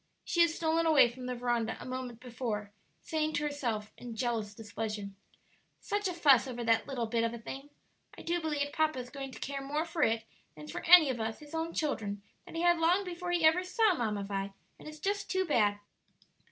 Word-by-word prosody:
She 345 - +2
had 335 - +6
stolen 325 0 +1
away 295 -6 +6
from 250 +1 -8
the 250 - -2
veranda 240 -2 -1
a - - -8
moment 255 -2 -5
before, 230 -4 -4 0.3
saying 310 -1 -1
to 295 - 0
herself, 235 -8 -2
in 240 -2 -7
jealous 220 -3 -2
displeasure, 215 -2 -5 0.7
"Such 410 -1 -1
a 365 - -2
fuss 280 -7 +5
over 240 -2 -4
that 225 0 +2
little 255 -4 -2
bit 230 0 0
of 230 0 -1
a - - -6
thing! 270 +5 -8 0.5
I - - -9
do 345 +1 0
believe 290 -2 -1
papa 310 -2 +1
is 250 0 -6
going 275 -2 -6
to - - -10
care 275 0 -4
more 295 +4 -1
for 330 -1 -4
it 225 -4 +2 0.3
than 150 0 -9
for - - -6
any 330 -5 +9
of 240 - -5
us, 220 0 -2
his 295 0 -14
own 325 +1 -2
children, 205 -10 -2 0.2
that - - -10
he 330 - -1
had 345 -1 +4
long 350 +4 +3
before 355 -1 -5
he 345 -2 +2
ever 325 +3 +5
saw 395 +3 +3
Mamma 215 - -1
Vi; 195 0 -3 0.3
and - - -11
it's 305 0 -8
just 405 +5 -2
too 375 0 +1
bad." 210 - +2
270 Hz, 220 wpm, -31 LUFS, 230-325 Hz, 0.7 s, any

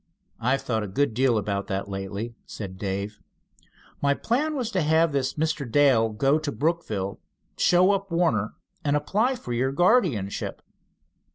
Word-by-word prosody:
"I've 130 +4 +1
thought 110 -3 -1
a 105 - -3
good 115 +5 0
deal 125 0 +3
about 100 -1 -2
that 95 +1 -2
lately," 100 +4 -5
said 95 -3 -7
Dave. 100 +1 -3 0.8
"My 140 0 +3
plan 295 - 0
was 245 -5 -2
to 185 - +1
have 160 +1 +3
this 135 -2 -1
Mr. 155 -5 -1
Dale 130 -5 +4
go 135 +8 +2
to 155 -2 -3
Brookville, 110 - -2 0.4
show 180 +2 +4
up 195 0 -1
Warner, 145 - +1 0.3
and 145 -1 +2
apply 210 - +1
for 125 - -6
your 130 +3 +1
guardianship." 165 - +1
135 Hz, 155 wpm, -25 LUFS, 105-165 Hz, 0.8 s, Dale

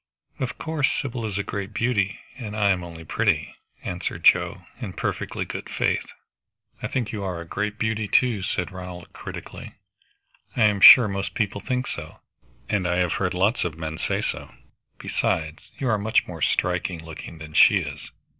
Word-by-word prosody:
"Of 130 -2 -3
course. 155 -4 0
Sybil 125 -4 -3
is 100 -2 -3
a 100 - 0
great 100 +1 -5
beauty, 100 -5 0
and 110 -5 -6
I 100 -2 +4
am 90 -2 0
only 85 -1 -9
pretty," - - +1 0.3
answered 90 0 -4
Joe - - +4
in - - -5
perfectly - - -3
good - - -6
faith. - - 0 0.7
"I - - -2
think 120 -6 -2
you 105 -3 -4
are 90 -3 -3
a 85 - -7
great 105 +5 -3
beauty 110 -1 -1
too," 120 -2 +3
said 90 0 -2
Ronald 90 -2 -9
critically. - - -8 0.8
"I 115 - +4
am 105 -2 +3
sure 120 +2 +11
most 100 -1 -3
people 100 -2 -1
think 125 0 -1
so, 80 -8 -6 0.5
and 95 -4 0
I 90 - +1
have 90 -2 +1
heard 90 -2 0
lots 100 +7 +2
of 80 -3 -3
men 80 -1 -5
say - - 0
so. - - -4 0.5
Besides, 80 0 -2
you 135 - -2
are 110 -3 +2
much 110 +2 +2
more - - -8
striking 90 -2 0
looking 80 0 -9
than 80 0 -10
she - - +7
is." - - -3
100 Hz, 180 wpm, -24 LUFS, 90-110 Hz, 0.8 s, sure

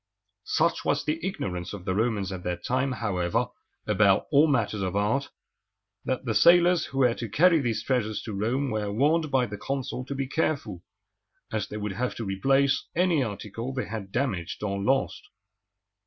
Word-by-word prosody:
Such - - +1
was - - 0
the 155 +2 -2
ignorance 100 - -3
of 95 -3 -8
the 95 - 0
Romans 105 -2 0
at 95 -2 -5
that 90 0 -4
time, 130 +2 0
however, 90 -7 -1 0.4
about - - +3
all 145 +3 +6
matters 110 -7 0
of 95 -1 -2
art, 110 +8 0 0.8
that 130 0 -2
the 115 - 0
sailors 175 +9 +5
who 135 - -8
were 125 -3 +4
to 115 -1 -6
carry 170 - +5
these 115 -5 -1
treasures 115 -5 0
to 110 - -6
Rome 120 +7 -1
were 105 -2 -2
warned 150 +8 +2
by 130 -3 +2
the 105 -3 -7
consul 135 -1 -3
to 140 - -5
be 135 0 -1
careful, 130 - -1 0.7
as 110 -2 -2
they 105 - -6
would 105 -1 -3
have 125 +5 -2
to 115 - -5
replace 135 +8 +2
any 175 -3 +3
article 115 +2 -5
they 130 -4 -2
had 105 -2 -6
damaged 105 -9 -2
or 100 -1 -2
lost. 135 +6 +1
120 Hz, 180 wpm, -27 LUFS, 100-140 Hz, 0.8 s, all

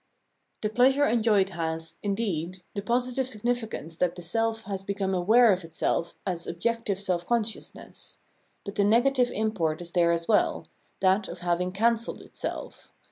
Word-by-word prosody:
The 215 - +1
pleasure 265 +5 +4
enjoyed 215 -6 +3
has, 165 -2 -3
indeed, 190 -4 -2
the 200 - -3
positive 250 +3 0
sig 215 -5 -8
nificance 225 -9 -2
that 180 -1 +1
the 175 - -9
self 225 +5 -1
has 195 -1 -4
become 195 -1 -2
aware 215 +5 +5
of 185 -1 -3
itself 165 +1 -1
as 175 -3 -3
objective 205 +2 -1
self 180 -3 -1
consciousness: 230 -2 -3 0.5
but 200 - -5
the 205 - +2
negative 245 +4 +3
import 195 -9 -1
is 175 -1 -7
there 170 -1 +3
as 170 0 -1
well 215 - +2 0.2
— - - -41
that 190 +2 +3
of - - -8
having 180 +1 0
cancelled 230 +4 0
itself. - - -6
200 Hz, 160 wpm, -27 LUFS, 175-230 Hz, 0.5 s, aware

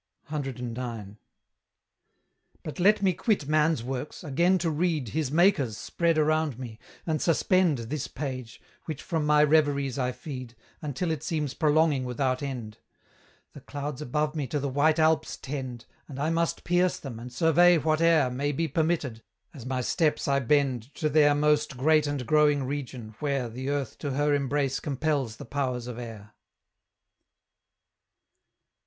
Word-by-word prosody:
CIX. 135 -5 -4 2.0
But 155 +3 -7
let 205 +3 +4
me 190 -2 +4
quit 200 - 0
man's 155 -4 +2
works, 130 +6 -5
again 170 +5 +2
to 170 -2 -1
read 155 -5 0
His 150 0 -1
Maker's 155 - +3
spread 170 -2 0
around 155 -3 +1
me, 120 -4 -8 0.3
and 155 -2 -1
suspend 175 -2 +3
This 125 +5 -4
page, 130 -5 -6 0.3
which 155 -2 -5
from 160 -4 -1
my 150 0 +5
reveries 145 -3 +2
I 125 -1 0
feed, 125 -3 -8 0.3
Until 155 +3 -2
it 155 -4 -2
seems 150 -4 -2
prolonging 155 -3 +2
without 130 +1 -1
end. 120 -6 -5 0.7
The 145 - -11
clouds 145 +1 -5
above 150 +3 -1
me 145 -4 -2
to 145 - -2
the 140 - -2
white 150 +4 +3
Alps 160 -1 +2
tend, 130 -4 -6 0.2
And 140 - -9
I 155 +3 0
must 165 0 0
pierce 175 +1 +2
them, 125 -5 -8
and 125 +2 -8
survey 170 +6 +5
whate'er 155 -3 +3
May 140 +3 -1
be 165 +3 0
permitted, 155 -9 -1 0.3
as 130 -4 -9
my 130 -1 -1
steps 155 +4 0
I 140 0 +3
bend 135 -2 0
To 155 - 0
their 145 -1 +5
most 150 -1 +1
great 155 +3 +3
and 145 -3 -3
growing 150 -1 +3
region, 130 -5 -5
where 140 -4 -1
The 130 +4 -5
earth 140 -5 -3
to 140 -2 -3
her 145 +2 +2
embrace 140 -1 0
compels 140 -4 -1
the - - -10
powers 125 -2 -2
of 125 -1 -6
air. 110 -4 -9
145 Hz, 155 wpm, -27 LUFS, 130-155 Hz, 2.0 s, my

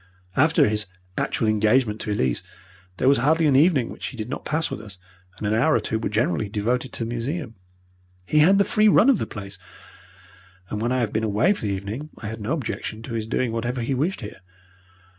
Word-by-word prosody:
After 155 0 +4
his 105 0 -1 0.3
actual 115 - -1
engagement 110 +1 +2
to 105 - -3
Elise, 65 -12 0 0.6
there 130 - +1
was 140 -1 +5
hardly 160 +5 +3
an 145 -3 +4
evening 140 -4 +4
which - - -6
he 130 - -8
did 110 +1 -5
not 140 - -5
pass 160 +2 0
with - - -5
us, 105 -4 -11 0.4
and 105 - -5
an 105 - +1
hour 130 +8 +3
or - - +3
two 110 - -2
were 110 - -2
generally 105 -2 0
devoted 120 +5 -1
to 115 - -3
the - - -5
museum. 120 +2 -3 0.7
He 155 - +2
had 185 +6 +6
the 200 - +5
free 215 0 +3
run 220 +5 +6
of 245 - +1
the - - -2
place, 100 -1 -8 1.1
and 105 - -3
when 120 +2 0
I 130 0 +1
have 110 -3 -1
been 110 +1 0
away 110 - +3
for 110 - -5
the 100 - 0
evening 105 +10 -5
I 105 - -6
had 110 0 -7
no 110 +9 -1
objection 115 -6 -4
to 115 - -7
his 110 -1 -3
doing 125 0 0
whatever 120 +2 -2
he 120 +4 -1
wished 150 +8 -1
here. 105 - -8
115 Hz, 225 wpm, -24 LUFS, 105-145 Hz, 1.1 s, had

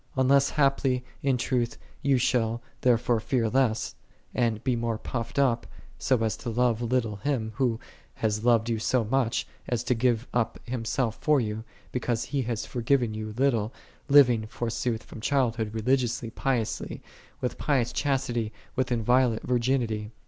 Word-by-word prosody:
Un 130 0 +3
less 140 0 +5
haply, 135 -3 +2 0.2
in 135 -2 +2
truth, 120 -1 -1 0.3
thou 140 -1 +4
shalt 120 -2 +1 0.2
therefore 120 -1 +3
fear 115 +1 0
less, 125 -3 +1 0.4
and 115 -3 0
be 130 -2 +1
more 115 -1 -1
puffed 115 +1 -5
up, 130 -4 +2 0.3
so 125 -4 +2
as 110 - 0
to 120 - -6
love 120 0 +1
little 115 -3 0
Him, 110 -1 -1
Who 120 -4 +1 0.4
hath 105 -1 -1
loved 115 -2 +4
thee 115 -1 -1
so 120 +2 +1
much, 120 +1 0 0.2
as 120 -1 0
to 125 - +2
give 120 -1 +1
up 120 -2 0
Himself 120 -1 -2
for 150 -2 +4
thee," 105 -3 -2 0.3
because 120 -2 -1
He 135 +2 -1
hath 115 -2 -2
forgiven 120 -1 +1
thee 110 0 -4
little, 115 -1 +1 0.4
living, 125 -6 +6
forsooth 115 0 -2
from 110 - -10
childhood, 115 -4 +1
religiously, 120 0 0
piously, 120 -3 -2 0.4
with 125 - -3
pious 130 -6 +1
chastity, 120 -6 0 0.2
with 130 -1 0
inviolate 120 0 +2
virginity. 120 -4 0
120 Hz, 155 wpm, -27 LUFS, 115-130 Hz, 0.4 s, living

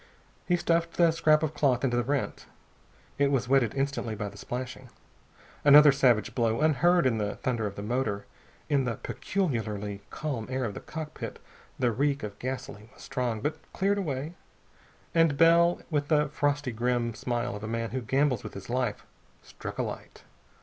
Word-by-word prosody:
He 180 - +3
stuffed 170 -1 0
the 170 -2 +5
scrap 155 -1 +3
of 155 -1 -1
cloth 130 -4 +2
into 125 -3 +1
the 120 - +2
rent. 140 +3 -2 0.7
It 140 -1 +4
was 130 -4 0
wetted 130 -4 +3
instantly 135 -5 -1
by 105 -1 -4
the 100 - -15
splashing. 125 +4 -6 0.7
Another 145 +1 +9
savage 125 -4 +2
blow, 115 -2 +1
unheard 160 +3 +3
in 115 -4 +2
the 105 -1 -2
thunder 120 -4 -1
of 100 - -7
the 100 - -6
motor. 105 -3 -1 0.4
In 140 -3 +2
the 115 -2 -1
peculiarly 105 - -3
calm 135 -8 -4
air 130 -1 -1
of 105 - -3
the - - -6
cockpit 155 -1 -7 0.4
the 125 -2 +2
reek 140 +4 0
of 105 -1 -6
gasoline 120 -4 -6
was - - -14
strong, 125 -5 -2
but 150 +5 -2
cleared 200 +1 +1
away. 150 -3 -3 0.8
And 165 -4 +3
Bell, 170 +2 +5
with 145 -2 0
the 150 -1 +2
frosty 145 -2 0
grim 120 0 0
smile 120 -1 -2
of 105 - -8
a - - -3
man 115 0 -2
who 130 +1 -2
gambles 130 +1 +1
with - - -8
his 100 +4 -8
life, 125 -4 -1 0.4
struck - - -8
a - - 0
light. - - -8
130 Hz, 175 wpm, -28 LUFS, 115-150 Hz, 0.8 s, Another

